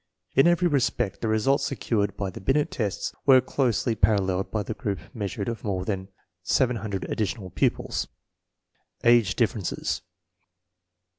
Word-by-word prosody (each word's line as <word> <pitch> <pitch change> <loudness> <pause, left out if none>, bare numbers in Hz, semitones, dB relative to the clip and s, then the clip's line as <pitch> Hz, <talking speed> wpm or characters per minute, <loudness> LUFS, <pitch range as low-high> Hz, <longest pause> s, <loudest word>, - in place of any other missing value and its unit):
In 135 +5 +6
every 175 +1 +4
respect 120 - 0
the 115 - -1
results 120 +6 +2
secured 105 -7 -1
by 100 -2 -2
the - - -9
Binet 145 +7 +1
tests 105 -5 -2
were 130 -2 +8
closely 125 -3 0
paralleled 95 -3 +1
by 105 -2 -1
the 110 - -4
group 100 -2 -3 0.2
meas 100 -4 -4
urements 100 0 -2
of - - -25
more 95 -3 -2
than 95 -2 -3 0.3
700 110 -4 0
additional 105 -3 -3
pupils. - - 0 1.0
Age 115 -5 +5
differences. 110 -5 -1
110 Hz, 140 wpm, -26 LUFS, 100-125 Hz, 1.0 s, were